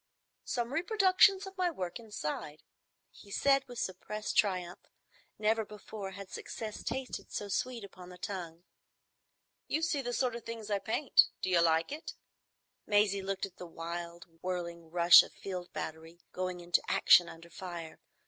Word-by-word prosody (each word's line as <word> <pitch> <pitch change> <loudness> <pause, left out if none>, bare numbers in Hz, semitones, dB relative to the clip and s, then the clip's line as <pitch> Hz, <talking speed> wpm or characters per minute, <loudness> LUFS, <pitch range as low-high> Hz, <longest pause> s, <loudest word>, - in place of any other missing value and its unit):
"Some 240 +1 -2
reproduction 385 +2 +5
of 385 0 -9
my 360 -1 +3
work 185 - -4
inside," 155 -8 -5 0.5
he 205 - -16
said, 275 +5 +3
with 245 -1 -9
suppressed 210 +2 -4
triumph. 180 -3 +1 0.6
Never 220 +1 +2
before 210 -1 -8
had 200 0 -9
success 215 -2 -6
tasted 260 +1 -4
so 205 - -4
sweet 240 +3 -2
upon 185 -2 -11
the 180 - -11
tongue. 175 -3 -6 1.0
"You 315 - 0
see 300 -4 +1
the 245 -2 -3
sort 245 -1 0
of 235 - -7
things 225 -2 -6
I 200 - +2
paint. 225 +8 +4 0.2
D'you 180 -2 +3
like 165 +3 +3
it?" 305 +3 -6 0.7
Maisie 205 -1 +3
looked 195 0 -2
at 195 - -14
the 180 - -8
wild 170 +1 -6 0.2
whirling 170 -2 -4
rush 170 +1 +9
of - - -9
a - - -25
field 180 -2 -5
battery 160 +2 -7
going 185 -1 -3
into 175 0 +2
action 175 - +6
under 170 +1 -12
fire. 170 -3 -7
195 Hz, 160 wpm, -32 LUFS, 175-230 Hz, 1.0 s, rush